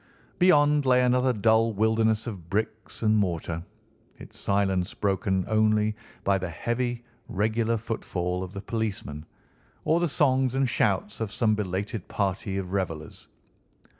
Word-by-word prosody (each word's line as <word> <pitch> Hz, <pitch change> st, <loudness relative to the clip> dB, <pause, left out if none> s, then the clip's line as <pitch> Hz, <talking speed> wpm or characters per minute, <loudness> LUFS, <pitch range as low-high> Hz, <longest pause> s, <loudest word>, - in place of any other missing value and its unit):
Beyond 150 Hz, -5 st, +5 dB
lay 125 Hz, 0 st, +5 dB
another 125 Hz, +1 st, +3 dB
dull 110 Hz, 0 st, +3 dB
wilderness 110 Hz, +1 st, +2 dB
of 95 Hz, -8 st, -7 dB
bricks 110 Hz, +3 st, -3 dB
and 110 Hz, 0 st, +4 dB
mortar, 85 Hz, -4 st, -1 dB, 0.5 s
its -, -, -11 dB
silence 95 Hz, -2 st, 0 dB
broken 95 Hz, -2 st, 0 dB
only 110 Hz, 0 st, +2 dB, 0.3 s
by 100 Hz, -1 st, +2 dB
the 95 Hz, -1 st, -4 dB
heavy, 120 Hz, +6 st, -2 dB, 0.2 s
regular 110 Hz, +3 st, 0 dB
footfall 90 Hz, -5 st, -3 dB
of 90 Hz, -, -7 dB
the 100 Hz, -, -5 dB
policeman, 95 Hz, -9 st, -4 dB, 0.6 s
or 160 Hz, +2 st, +3 dB
the 175 Hz, -, +2 dB
songs 130 Hz, -1 st, +2 dB
and 135 Hz, 0 st, +2 dB
shouts 105 Hz, -4 st, 0 dB
of 110 Hz, -2 st, -2 dB
some 110 Hz, -1 st, +2 dB
belated 100 Hz, 0 st, -3 dB
party 95 Hz, 0 st, -2 dB
of 95 Hz, -2 st, -4 dB
revellers. 80 Hz, -6 st, -4 dB
110 Hz, 135 wpm, -27 LUFS, 95-115 Hz, 0.6 s, Beyond